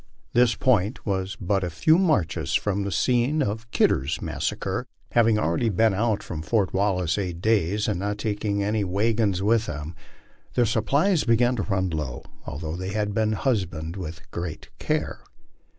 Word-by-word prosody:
This 120 -2 +4
point 110 -3 +1
was 95 0 -2
but 95 0 0
a 90 - -1
few 155 - +3
marches 150 - +1
from 100 -1 0
the 100 0 -2
scene 125 +7 +2
of 110 +1 -4
Kidder's 70 - +1
massacre. - - -3 0.2
Having 115 -2 +4
already 105 +4 +1
been 110 +2 +3
out 110 +1 0
from 80 -3 -5
Fori. 100 +2 +1
Wallace 95 -3 +1
eight 90 -4 -3
days, 105 0 +1
and 100 -5 -1
not 100 +1 -2
taking 105 -1 -1 0.3
wagons 105 -2 +1
with 115 +2 +2
them, 75 +3 -5 0.6
their 120 - +4
supplies 140 - +2
began 120 +1 +3
to - - 0
run 95 -3 -1
low, 75 -6 -4 0.2
although 80 +3 -4
they 95 +2 -4
had 105 -1 -1
been 110 +1 +1
husbanded 90 - -1
with 80 -4 -6
great 85 -2 -5
care. - - -1
100 Hz, 160 wpm, -25 LUFS, 90-115 Hz, 0.6 s, This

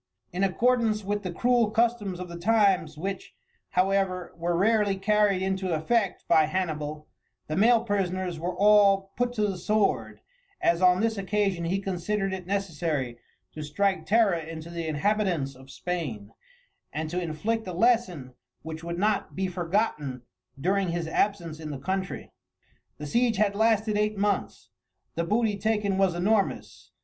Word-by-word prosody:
In 185 +2 -1
accordance 225 +2 +2
with 205 +1 -2
the 185 - -4
cruel 240 +4 +2
customs 220 -4 0
of 180 - -5
the 170 0 -8
times, 190 -6 +2
which, 195 +4 -5 0.3
however, 185 -1 0
were 170 0 -1
rarely 205 0 +2
carried 205 -1 +2
into 190 -2 -1
effect 195 +5 0
by 160 -2 +5
Hannibal, 155 -4 -3 0.4
the 155 - -3
male 230 +4 +4
prisoners 185 -5 -2
were 175 +2 -3
all 200 -1 +4
put 245 0 0
to 215 -3 +1
the 195 -3 -2
sword, 210 +3 0 0.4
as 170 +1 +2
on 180 +1 +5
this 225 -2 0
occasion 195 -3 0
he 180 +3 0
considered 195 +1 -2
it 185 -2 -6
necessary 160 -10 -2 0.3
to 155 - -8
strike 190 +7 -1
terror 220 -2 +4
into 165 0 -6
the 170 -1 -4
inhabitants 170 -3 0
of 130 +1 -16
Spain, 135 - -4 0.6
and 155 0 -4
to 180 +1 -1
inflict 195 +7 -2
a - - -3
lesson 180 - +1 0.3
which 160 0 -7
would 170 0 -4
not 210 +2 0
be 190 - -1
forgotten 170 - -1 0.4
during 190 +4 +1
his 170 -1 -2
absence 170 -3 -1
in 155 -1 -6
the 145 - -4
country. 190 +5 -4 0.7
The 150 - -7
siege 235 - +1
had 205 0 +2
lasted 220 0 +2
eight 210 0 0
months. 205 0 -2 0.4
The 170 - -1
booty 210 +1 +1
taken 210 -2 0
was 190 -3 +2
enormous. 200 +3 -1
190 Hz, 155 wpm, -27 LUFS, 170-210 Hz, 0.7 s, by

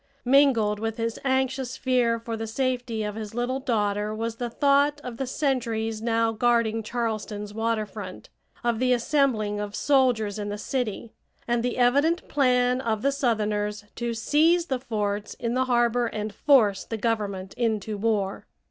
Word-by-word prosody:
Mingled 245 -6 +4
with 225 0 -3
his 230 0 -2
anxious 265 -1 0
fear 250 -3 +2
for 230 0 -5
the 225 0 -4
safety 245 -2 -1
of 210 0 -3
his 215 0 -7
little 245 +2 -1
daughter 210 -4 -1
was 225 +1 -3
the 240 0 -3
thought 285 +3 +3
of 245 -2 -6
the 270 - -3
sentries 230 -6 -1
now 230 0 +1
guarding 225 -1 +2
Charleston's 215 -2 -3
water 225 0 0
front, 200 -2 -9 0.3
of 235 -2 0
the 255 0 +3
assembling 235 -5 +1
of 205 0 -4
soldiers 245 -7 +2
in 205 0 -3
the 205 - -4
city, 230 0 -3 0.3
and 240 0 +1
the 245 +1 -2
evident 285 +8 +2
plan 250 -2 +2
of 220 -4 -1
the 275 - +3
southerners 210 -5 -1
to 235 -1 -2
seize 320 +9 +3
the 265 -6 -2
forts 210 -4 -3
in 235 -1 -3
the 260 +1 +1
harbor 240 -1 +2
and 215 -1 -4
force 215 -7 +3
the 225 - -5
Government 205 -4 -2
into 220 -3 -1
war. 205 -2 -1
230 Hz, 165 wpm, -26 LUFS, 215-255 Hz, 0.3 s, Mingled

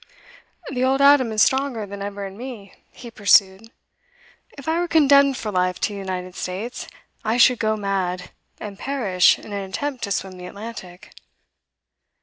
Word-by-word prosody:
'The 255 -1 -1
old 265 +1 +2
Adam 280 -4 +5
is 215 -1 +4
stronger 265 -5 0
than 200 0 -9
ever 200 0 -5
in 195 0 -9
me,' 230 -4 -9 0.2
he 240 -2 -12
pursued. 200 0 +3 0.9
'If 275 - -11
I 325 +1 +1
were 350 - -1
condemned 280 -4 +4
for 215 - -4
life 180 -1 0
to - - +1
the 200 - -6
United 185 -1 -5
States, 215 +9 -5 0.4
I 225 +2 0
should 250 0 +5
go 215 -1 0
mad, 190 -3 -3 0.3
and 205 -2 -8
perish 215 -10 +2
in 210 - -11
an 195 -1 -4
attempt 275 +6 -4
to 200 - -7
swim 190 -1 -3
the 180 - -8
Atlantic. 200 -3 -10
210 Hz, 165 wpm, -22 LUFS, 190-260 Hz, 0.9 s, Adam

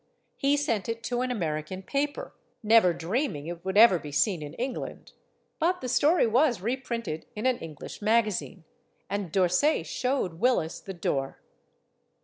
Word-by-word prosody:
He 280 +1 +2
sent 235 -8 -1
it 230 0 -4
to 245 0 -1
an 255 - -1
American 170 -4 -3
paper, 285 +6 -2 0.3
never 220 -4 +6
dreaming 175 - -2
it 170 0 -7
would 190 +1 -2
ever 215 -5 +7
be 150 -1 -8
seen 155 +4 +1
in 150 +1 -7
England. 250 +1 -5 0.5
But 355 +3 +1
the 255 - -5
story 295 +7 +3
was 240 +1 +3
reprinted 230 -6 -3
in 215 - -4
an 255 -2 +2
English 155 +3 -9
magazine. 210 -4 0 0.5
And 200 -4 -3
D'Orsay 185 - +2
showed 250 -11 -2
Willis 235 -9 +1
the 195 - -8
door. 135 -5 -2
215 Hz, 150 wpm, -27 LUFS, 170-255 Hz, 0.5 s, ever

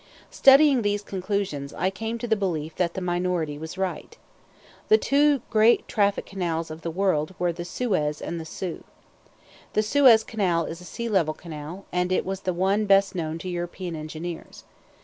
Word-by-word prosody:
Studying 275 -1 +6
these 205 -1 0
conclusions, 185 -8 -3
I 185 - 0
came 225 +3 -4
to 240 - -5
the 220 - +3
belief 165 -6 -3
that 170 -2 0
the 190 - -3
minority 175 -4 -1
was 160 +3 -7
right. 190 -1 -4 0.7
The 435 - +6
two 285 - +2
great 220 +1 +4
traffic 200 -2 +1
canals 170 -4 -3
of 160 +1 -8
the 165 - -3
world 180 -2 0
were 175 -1 0
the 175 +1 -6
Suez 175 -9 -1
and 170 -1 -4
the - - -8
Soo. 170 +2 -6 0.9
The 215 - +2
Suez 235 -1 +6
Canal 180 -8 0
is 165 +2 -7
a - - -11
sea 235 +5 -5
level 170 -8 +1
canal, 165 +3 -8
and 180 0 0
it 185 - +1
was 190 0 -3
the 185 - -2
one 195 +4 +1
best 195 0 +4
known 160 -3 -3
to 175 - -8
European 175 0 -4
engineers. 160 +2 -7
185 Hz, 180 wpm, -25 LUFS, 165-205 Hz, 0.9 s, Studying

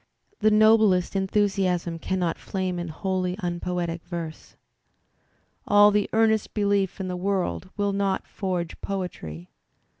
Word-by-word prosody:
The 215 - +4
noblest 215 -4 +4
enthusiasm 190 -3 0
cannot 180 -1 -1
flame 185 -2 -3
in 175 - -4
wholly 185 +2 -2
un 175 -4 -3
poetic 175 -2 -3
verse. 170 -3 -7 1.1
All 205 0 +7
the 205 -1 +1
earnest 220 -1 +2
belief 200 -3 +1
in 190 - -3
the 180 - -3
world 185 0 -2
will 205 -1 0
not 195 -1 0
forge 180 -3 -4
poetry. 90 - -5
190 Hz, 125 wpm, -25 LUFS, 175-200 Hz, 1.1 s, All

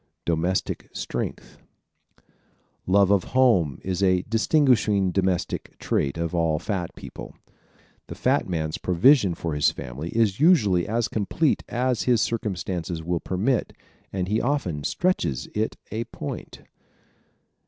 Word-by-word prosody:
Domestic 85 +3 -1
Strength - - -5 0.6
¶ - - -31 0.6
Love 100 +1 +4
of 100 -3 +3
home 95 - +4
is 95 0 -2
a 95 -2 +3
distinguishing 115 - +2
domestic 95 -1 -1
trait 70 +3 -1
of 85 0 -2
all 80 -2 +1
fat 95 -2 -3
people. - - -10 0.7
The - - -7
fat - - +1
man's 80 -3 -2
provision 95 - +4
for 80 -1 -3
his 75 0 +3
family 70 +7 -6
is 110 -1 +1
usually 110 - +4
as 115 +1 0
complete 120 +9 0
as 125 -1 0
his 120 -2 +4
circumstances 90 -7 -2
will 85 +1 -1
permit 105 +9 -1 0.4
and 95 -2 -2
he 105 +3 +1
often 120 - -1
stretches 90 - 0
it 110 +1 -1
a 115 +2 -2
point. - - -7
95 Hz, 130 wpm, -25 LUFS, 85-115 Hz, 0.7 s, Love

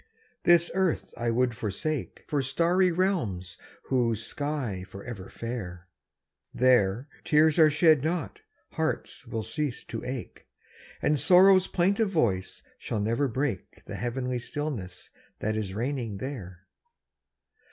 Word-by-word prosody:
This 170 -1 +5
earth 190 -3 0
I 120 0 -1
would 120 +1 +1
forsake 115 +8 -3
For 145 -2 0
starry 175 +7 +2
realms 120 - -1 0.2
whose 115 -4 0
sky's 130 -11 -3
forever 100 0 -8
fair; 95 -7 -6 0.6
There, 125 -1 +3 0.2
tears 155 +1 +4
are 155 -1 +8
shed 155 -2 +4
not, 175 - -2 0.3
hearts 160 -5 -3
will 115 -2 -3
cease 140 +3 -3
to 115 - -6
ache, 125 -2 -6 0.6
And 150 -1 +2
sorrow's 185 +2 +6
plaintive 195 +4 +2
voice 105 - 0 0.2
shall 110 - -3
never 115 +7 +1
break 130 -5 -3
The - - -8
heavenly 125 +1 -2
stillness 120 -8 -5 0.3
that 110 +1 -1
is 100 -3 -3
reigning 120 -3 -2
there. 100 -8 -7
125 Hz, 120 wpm, -28 LUFS, 110-155 Hz, 0.6 s, are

